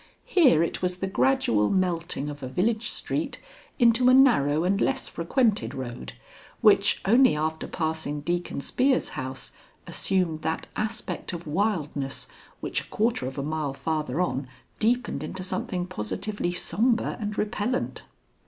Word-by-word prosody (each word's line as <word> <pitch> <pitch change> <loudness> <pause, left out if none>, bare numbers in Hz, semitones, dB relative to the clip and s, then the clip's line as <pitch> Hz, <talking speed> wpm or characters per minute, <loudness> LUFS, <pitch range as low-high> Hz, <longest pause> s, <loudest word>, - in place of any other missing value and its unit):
Here 265 - +5
it 170 - -3
was 180 0 -1
the 195 - -2
gradual 190 - +2
melting 170 -5 0
of 145 -1 -6
a 130 - -4
village 215 - 0
street - - -3 0.4
into 240 0 +5
a 255 - +7
narrow 165 - +5
and 195 +3 +1
less 270 0 0
frequented 215 +5 0
road, 120 - -6 0.5
which - - +4
only 240 - +5
after 160 +1 -2
passing 160 -3 -2
Deacon 175 -2 -2
Spear's 260 - +1
house 130 0 -5 0.3
assumed 180 -5 0
that 160 +1 -2
aspect 215 -2 -3
of 170 0 -6
wildness 150 -6 -1 0.3
which - - -1
a - - -14
quarter 220 - 0
of 130 - -7
a 140 - -2
mile 150 -2 -2
farther 155 -1 -2
on 140 -7 -1 0.3
deepened 235 - +1
into 185 +4 -5
something 185 -1 -2
positively 185 - -3
sombre 225 +7 +1
and 210 0 -3
repellent. 210 +4 -1
180 Hz, 145 wpm, -26 LUFS, 150-220 Hz, 0.5 s, a